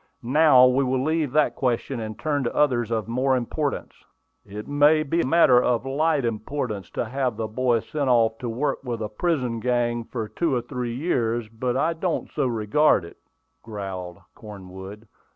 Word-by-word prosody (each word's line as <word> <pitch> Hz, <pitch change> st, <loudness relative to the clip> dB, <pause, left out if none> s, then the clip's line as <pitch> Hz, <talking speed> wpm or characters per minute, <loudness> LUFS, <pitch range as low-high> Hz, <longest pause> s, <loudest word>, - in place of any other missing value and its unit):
"Now 130 Hz, 0 st, +6 dB
we 130 Hz, +2 st, +3 dB
will 130 Hz, 0 st, 0 dB
leave 155 Hz, -2 st, 0 dB
that 155 Hz, -1 st, +2 dB
question, 125 Hz, 0 st, -1 dB
and 110 Hz, -1 st, -6 dB
turn 145 Hz, -3 st, -1 dB
to -, -, -3 dB
others 120 Hz, -6 st, +2 dB
of 110 Hz, -2 st, -2 dB
more 130 Hz, +3 st, +1 dB
importance." 140 Hz, +4 st, -3 dB, 0.5 s
"It 105 Hz, +1 st, -8 dB
may 145 Hz, +2 st, +4 dB
be 165 Hz, +3 st, 0 dB
a -, -, -1 dB
matter 130 Hz, -5 st, +5 dB
of 125 Hz, 0 st, 0 dB
light 145 Hz, 0 st, +1 dB
importance 110 Hz, -3 st, -3 dB
to -, -, -1 dB
have 125 Hz, -1 st, -2 dB
the 110 Hz, -1 st, -2 dB
boy 120 Hz, +1 st, +1 dB
sent 145 Hz, +1 st, -2 dB
off 115 Hz, -2 st, +3 dB
to 120 Hz, -, -4 dB
work 130 Hz, +5 st, -2 dB
with 120 Hz, -4 st, -4 dB
a 105 Hz, -, -4 dB
prison 125 Hz, -2 st, -1 dB
gang 120 Hz, -1 st, 0 dB
for 115 Hz, -3 st, -5 dB
two 140 Hz, +7 st, -1 dB
or 120 Hz, -, 0 dB
three 120 Hz, -2 st, -4 dB
years, 120 Hz, -6 st, -1 dB
but 120 Hz, +3 st, -2 dB
I 160 Hz, +5 st, +1 dB
don't 165 Hz, +1 st, -3 dB
so 130 Hz, -, 0 dB
regard 115 Hz, -, +2 dB
it," 85 Hz, -, -13 dB, 0.4 s
growled 95 Hz, -5 st, -6 dB, 0.2 s
Cornwood. 100 Hz, +1 st, -10 dB
125 Hz, 180 wpm, -24 LUFS, 110-140 Hz, 0.5 s, Now